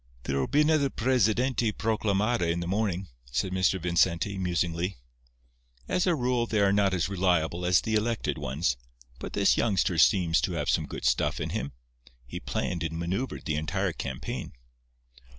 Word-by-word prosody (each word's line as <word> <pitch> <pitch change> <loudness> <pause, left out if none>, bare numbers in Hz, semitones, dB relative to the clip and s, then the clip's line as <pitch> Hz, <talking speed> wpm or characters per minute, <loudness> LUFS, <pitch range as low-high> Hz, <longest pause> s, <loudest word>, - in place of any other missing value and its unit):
"There'll 70 +1 -1
be 150 - +3
another 150 -2 +3
'presidente 120 -1 +1
proclamada' 105 -3 0
in 85 - -1
the 85 - -3
morning," 95 -1 -1 0.2
said 70 +9 -2
Mr. 95 0 +2
Vincenti, 85 +2 +1
musingly. 90 0 -1 0.9
"As 180 - +1
a 175 - +3
rule 125 -3 0
they 110 - 0
are 100 -1 +4
not 100 -2 +2
as 90 - 0
reliable 90 -2 0
as 90 0 +4
the 110 - -3
elected 110 +1 0
ones, 65 -1 -1 0.4
but - - -7
this - - +3
youngster 95 -5 +1
seems 85 -3 +4
to - - -1
have - - 0
some - - 0
good - - -6
stuff - - +1
in - - -3
him. 70 - -3 0.5
He - - -7
planned 85 - -3
and 80 0 -3
manœuvred 95 +10 -3
the 75 -1 -1
entire 90 +4 -1
campaign. - - -5
95 Hz, 165 wpm, -28 LUFS, 85-110 Hz, 0.9 s, are